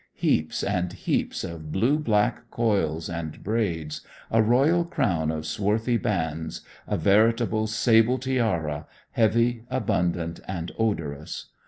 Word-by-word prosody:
Heaps 80 - 0
and 90 -1 -1
heaps - - -1
of 80 -2 -6
blue 125 - +2
black 115 -2 +1
coils 100 -10 0
and 85 -3 -6
braids, 85 -9 -1 0.3
a 115 - +4
royal 135 +10 +4
crown 100 - 0
of 80 0 -3
swarthy 110 +6 0
bands, 80 -8 -2 0.3
a - - 0
veritable 110 +2 +3
sable 115 +2 +4
tiara, 110 - -1 0.2
heavy, 115 +1 +2
abundant 85 -4 -1
and 90 -2 -4
odorous. 80 -9 -2
105 Hz, 120 wpm, -25 LUFS, 80-115 Hz, 0.3 s, a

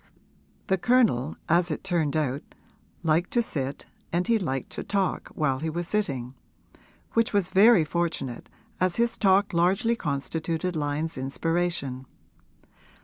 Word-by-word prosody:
The 190 -2 +1
Colonel, 225 - +2
as 170 +2 +3
it 155 - -4
turned 165 -5 0
out, 140 -2 -1 0.6
liked 165 +2 +2
to 240 - +3
sit 140 -8 -4 0.3
and 175 +2 +1
he 230 -1 +2
liked 135 -9 -3
to - - -5
talk 195 -2 -1
while 135 -4 0
he 160 +2 -2
was 170 +2 -3
sitting: 135 - -2 0.8
which 230 -1 +2
was 200 -3 +2
very 200 -3 +6
fortunate, 160 -7 -3 0.3
as 185 -1 +1
his 235 0 +2
talk 200 0 +3
largely 190 +8 +2
constituted 160 +2 -2
Lyon's 150 0 -2
inspiration. 140 -2 -2
170 Hz, 135 wpm, -26 LUFS, 145-190 Hz, 0.8 s, very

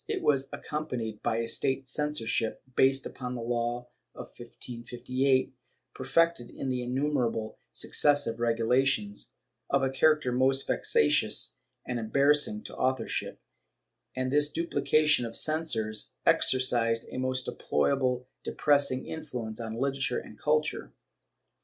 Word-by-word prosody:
It - - -2
was 135 -2 +2
accompanied 125 -8 -4
by - - 0
a 115 0 -1
state 130 +3 -1
censorship, 135 -5 -1
based 135 0 +3
upon 125 -1 -5
the 120 - -5
law 120 +1 -2 0.3
of - - -9
1558, 125 +3 -2 0.4
perfected 135 -1 +1
in 135 - -4
innumerable 125 -3 -1
successive 145 -6 +2
regulations, 115 -2 +1 0.4
of 140 -1 +2
a 135 - +1
character 150 -1 +3
most 130 +2 +2
vexatious 75 0 +2 0.3
and 120 -1 -3
embarrassing 145 - +2
to - - -7
authorship, 130 -3 -1 0.8
and 130 0 -1
this 145 +1 +3
duphcation 155 -4 +2
of 115 -1 -4
censors 135 -10 0 0.2
exercised 120 -3 +3
a - - -4
most 130 0 -1
deplorably 125 - 0 0.2
depressing 140 -3 +2
influence 125 -8 -6
on 110 -1 -5
literature 135 -2 0
and 105 - -9
culture. 150 0 0
130 Hz, 115 wpm, -29 LUFS, 115-140 Hz, 0.8 s, based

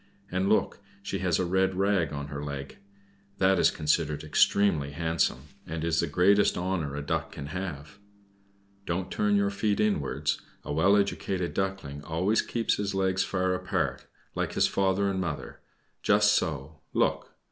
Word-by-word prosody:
And 95 +2 0
look, 110 - +1 0.2
she 100 -1 -3
has 90 -3 +1
a 90 - 0
red 95 +1 +1
rag 95 -5 +1
on 70 0 -5
her 70 +1 -5
leg! 70 +1 -6 0.6
That 95 -1 +3
is - - +5
considered 75 -1 0
extremely 75 -2 +2
handsome, 80 -4 -1 0.2
and 80 0 -4
is 85 -1 +1
the 85 - +1
greatest 95 +7 +3
honor 90 -6 -2
a 75 - -4
Duck 80 +1 -2
can 70 - -7
have. 90 +1 -6 0.9
Don't 90 +2 -2
turn 105 -1 +1
your 100 0 +2
feet 100 +1 0
inwards; 100 -10 0 0.2
a - - -4
well 95 +7 +4
educated 95 -3 -1
Duckling 95 -7 -3
always 90 +8 +1
keeps 115 -2 -1
his 100 -1 -2
legs 95 -1 +1
far 95 -1 0
apart, 90 - -2 0.3
like - - -2
his - - +3
father 95 +1 +1
and 95 -1 -1
mother, 85 - -5 0.4
just 105 0 +4
so 75 0 -2
look! - - 0
90 Hz, 160 wpm, -28 LUFS, 75-100 Hz, 0.9 s, is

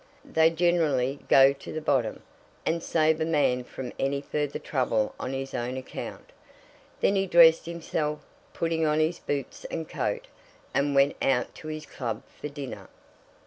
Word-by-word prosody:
"They 160 0 +4
generally 160 -6 +1
go 135 0 +7
to 140 - -10
the 155 - -3
bottom, 130 -7 0 0.4
and 165 +1 0
save 160 -1 +2
a - - +4
man 145 -6 +2
from 125 0 -7
any 140 +1 0
further 145 0 -2
trouble 115 -6 0
on 130 - -3
his 135 0 -4
own 125 +2 -2
account." 130 - -7 0.7
Then 200 - +3
he 195 0 +1
dressed 165 -2 +6
himself, 155 -3 -2 0.3
putting 165 -1 -1
on 155 0 +2
his 160 +2 +1
boots 140 -2 -4
and 160 -1 -4
coat, - - -2 0.5
and 140 0 +1
went 140 +1 +4
out 130 -2 +1
to 155 - -10
his 155 0 -5
club 115 -4 -4
for - - -6
his - - -11
dinner. 140 -3 -7
150 Hz, 165 wpm, -27 LUFS, 135-160 Hz, 0.7 s, go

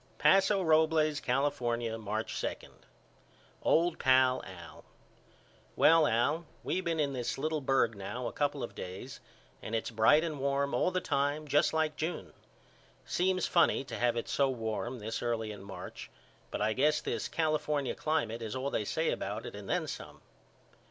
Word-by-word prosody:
Paso 195 0 +4
Robles, 155 -2 +3
California, 120 -5 0
March 110 0 -3
2. - - -1 1.1
OLD 170 +1 +2
PAL 130 -1 +4
AL: 85 -4 -11 0.9
Well 160 -1 +6
Al 145 +9 +1 0.2
we 185 - -1
been 165 -3 -1
in 140 -2 +1
this 125 -2 -3
little 155 +2 -1
berg 130 -4 +2
now 105 +6 -5
a - - -2
couple 145 -2 -1
of 120 - -5
days 95 +8 -7 0.4
and 110 - -4
its 115 - -2
bright 115 +8 +5
and 155 -4 -3
warm 140 0 0
all 125 - +2
the 185 0 -1
time 145 +1 -1
just 145 +1 +3
like 155 -1 0
June. 160 +3 -4 0.7
Seems 185 0 +1
funny 170 -5 +3
to - - -7
have 120 -1 +2
it 115 - -3
so 140 -1 +2
warm 115 0 -3
this 110 0 -4
early 115 -2 -1
in 105 -2 -9
March 100 0 -9 0.4
but - - -2
I 110 - +2
guess 150 +5 +3
this - - -3
California 150 -3 0
climate 115 -7 -1
is 110 0 -4
all 135 +2 -2
they 105 - -1
said - - 0
about - - -4
it - - -7
and - - -9
then - - +1
some. - - -8
140 Hz, 165 wpm, -31 LUFS, 115-155 Hz, 1.1 s, Well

